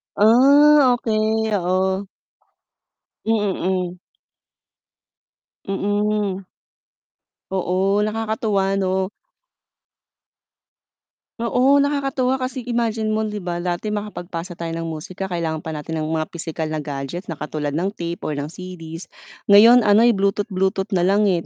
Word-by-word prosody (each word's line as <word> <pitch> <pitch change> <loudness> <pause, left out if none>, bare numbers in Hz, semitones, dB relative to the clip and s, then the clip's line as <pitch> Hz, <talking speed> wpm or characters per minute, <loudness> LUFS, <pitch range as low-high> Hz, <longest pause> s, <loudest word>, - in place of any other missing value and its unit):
Ah 275 +5 +6
okey, 220 -1 0
oo. 190 +2 0 1.2
Mm. 190 -4 -1 1.7
Mm. 205 -1 -1 1.1
Oo, 190 +2 +1
nakakatuwa 215 -3 -1
'no? 190 -1 0 2.3
Oo, 250 +4 +3
nakakatuwa 275 -2 0
kasi 255 -1 -4
imagine 225 -2 -1
mo 220 - 0
'di 210 -1 -3
ba, 175 -2 -4
dati 180 +4 -2
makapagpasa 180 -4 -6
tayo 165 -1 -4
ng 165 0 -4
musika 185 +4 -6
kailangan 165 -3 -2
pa 160 - -7
natin 155 +1 -4
ng 155 - -3
mga 160 -1 -1
pisikal 160 -1 -4
na 155 -1 -3
gadget, 145 +5 -6
na 160 - -4
katulad 150 -1 -3
ng 195 +4 -1
tape 170 -2 -4
or 150 - -2
ng 145 +1 -4
CDs 170 -2 -9 0.4
ngayon 225 +3 +7
ano'y 220 +1 +5
bluetooth-bluetooth 195 0 0
na 175 - +2
lang 200 +1 +3
eh, 170 -2 0
195 Hz, 115 wpm, -21 LUFS, 175-220 Hz, 2.3 s, ngayon